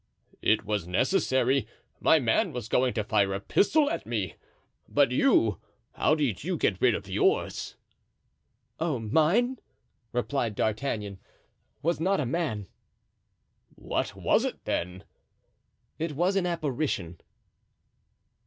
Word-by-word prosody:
"It 110 -1 +2
was 105 -4 -2
necessary; 130 - +1 0.3
my 160 - +5
man 120 -7 +1
was 120 -3 -5
going 125 +2 +1
to 110 - 0
fire 100 -2 +1
a - - -2
pistol 290 - +2
at 290 - -3
me; 105 -7 -2 0.6
but 140 -3 +3
you—how 125 - +1
did 135 - -1
you 180 +2 -1
get 95 -9 0
rid 120 -3 +4
of 100 - -6
yours?" 95 - 0 1.0
"Oh, 160 -4 0
mine," 165 - +2 0.5
replied 120 -2 -1
D'Artagnan, 105 -3 -2 0.6
"was 170 +1 +1
not 190 +4 +1
a 145 - 0
man." 125 - -2 1.1
"What - - -3
was - - +2
it - - -4
then?" 90 +2 -3 1.0
"It 160 -1 -2
was 175 +7 +1
an 190 -2 +1
apparition." 140 - -2
125 Hz, 120 wpm, -28 LUFS, 105-160 Hz, 1.1 s, my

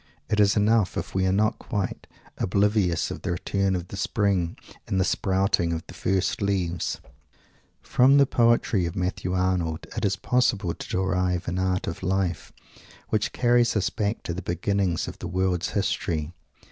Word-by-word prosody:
It 105 - +2
is 105 +1 +4
enough 105 -1 +2
if - - -4
we 95 0 +1
are - - +2
not 105 +3 +1
quite 100 -5 -4 0.3
oblivious 100 -2 +1
of - - -6
the - - -2
return 95 +2 0
of 90 -1 -5
the - - -7
Spring 100 -4 0 0.3
and 95 - 0
the - - +4
sprouting 95 -4 +1
of 80 0 -4
the - - -11
first 95 +1 0
leaves. 90 -4 -1 0.8
From 135 +3 +5
the 140 - +6
poetry 115 -7 +2
of 85 - -6
Matthew 90 -1 -2
Arnold 90 -3 0
it - - -3
is 100 -1 +2
possible 105 -4 +1
to - - -9
derive 90 -1 0
an 90 +2 -1
art 95 0 0
of 85 - -5
life 95 -1 -1 0.6
which 110 - 0
carries 120 -1 +3
us 100 -3 +1
back 105 +1 -2
to 85 - -3
the 90 - -5
beginnings 90 0 -1
of - - -8
the - - -5
world's 90 -1 0
history. 90 -6 -1
95 Hz, 170 wpm, -25 LUFS, 90-105 Hz, 0.8 s, the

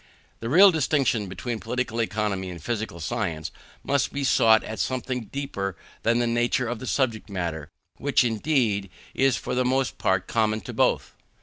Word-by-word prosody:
The 115 - -4
real 190 +7 +8
distinction 140 - +1
between 110 +5 -4
Political 125 -1 -2
Economy 105 -4 -1
and 85 -2 -7
physical 110 0 -4
science 85 -5 -3 0.3
must 140 -1 +1
be 140 - -3
sought 110 -4 +5
in 110 - -6
something 130 -2 -2
deeper 100 -9 -4 0.2
than 115 +1 +2
the 120 - +2
nature 120 +1 +1
of 120 -1 -3
the 130 - -7
subject 115 -6 0
matter; 85 -6 -4 0.3
which, 140 -1 +2
indeed, 115 -4 +1 0.2
is 135 -2 +2
for - - -4
the 125 0 +2
most 130 +1 0
part 95 0 +1
common 110 -1 0
to 90 - -8
both. - - +1
115 Hz, 170 wpm, -25 LUFS, 100-130 Hz, 0.3 s, real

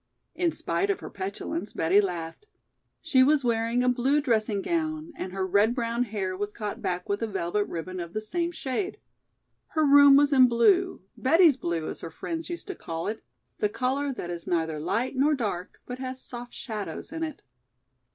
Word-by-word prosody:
In 345 -2 +1
spite 395 +4 -1
of 400 - +1
her - - -8
petulance 195 0 -4
Betty 180 +6 +4
laughed. 175 - -5 0.6
She 295 -5 +4
was 280 +1 +4
wearing 230 +1 +1
a - - +1
blue 250 +4 +3
dressing 215 -7 +1
gown 315 -1 -2
and 185 - -5
her 190 0 -2
red 205 +5 +3
brown 235 0 0
hair 195 -4 -3
was 205 +2 -4
caught 210 -3 -5
back 180 0 -2
with 200 +2 -1
a 225 - 0
velvet 200 0 -1
ribbon 180 +2 -5
of 170 -1 -6
the 215 - -1
same 340 +10 -2
shade. 350 +5 -3 0.7
Her 315 -1 +1
room 285 0 +8
was 290 +1 +5
in 260 -2 +7
blue, 355 - +3
"Betty's 325 +2 +5
Blue" 170 -9 -2
as - - -6
her - - -6
friends 325 - -5
used 345 -1 -5
to - - -2
call 165 0 -5
it, 220 +1 -4 0.4
the 210 - +2
color 270 +5 -1
that 175 -9 -5
is 170 -1 -6
neither 160 -3 0
light 230 - -1
nor 290 +3 +3
dark, 200 -8 -4
but 250 0 -6
has 260 0 -5
soft 245 -1 -9
shadows 220 +5 -6
in 325 - -4
it. 315 -3 -4
235 Hz, 190 wpm, -27 LUFS, 195-285 Hz, 0.7 s, room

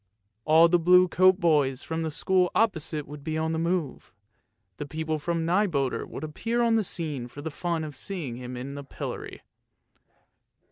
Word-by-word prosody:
All 160 +2 +6
the 175 +1 +3
blue 180 +2 +6
coat 185 +2 +4
boys 145 -7 +2
from 165 0 -3
the 160 - -1
school 180 +4 +2
opposite 160 -8 0
would 145 -1 -10
be 155 +1 -2
on 160 0 -1
the 160 - -1
move, 170 -3 -2 0.7
the 145 - -5
people 160 0 -3
from 165 +1 -2
Nyboder 165 - 0
would 140 - -8
appear 225 +10 -2
on 230 -1 +3
the 225 -1 +3
scene 150 -9 -2
for 145 +4 -10
the 160 - -4
fun 170 +1 -2
of 150 -2 -7
seeing 160 -12 -5
him 125 0 -7
in 135 +3 -6
the 140 0 -7
pillory. 140 - -7
160 Hz, 180 wpm, -27 LUFS, 145-180 Hz, 0.7 s, All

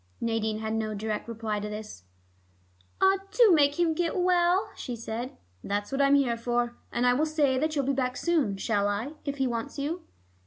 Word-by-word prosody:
Nadine 220 -2 -1
had 220 0 -3
no 215 -1 -2
direct 215 +1 -3
reply 225 -2 -3
to 210 +1 -4
this. 210 - -8 0.9
"Ah, 385 0 +5
do 430 +1 +5
make 290 -1 +3
him 335 -2 +3
get 340 +3 -1
well," 360 +1 +3
she 245 - -5
said. 230 +2 -5 0.3
"That's 205 +3 -2
what 270 +1 0
I'm 280 0 +5
here 255 -5 +2
for. 240 0 -1 0.2
And 240 - 0
I 245 - +5
will 300 +5 +1
say 290 -4 +2
that 310 +2 0
you'll 280 -2 +1
be 275 - +1
back 255 -1 -1
soon, 300 - +1
shall 205 0 +1
I, 215 +8 -2
if 280 -1 -3
he 270 - +1
wants 240 +3 -3
you?" 305 +5 -2
250 Hz, 200 wpm, -28 LUFS, 220-305 Hz, 0.9 s, Ah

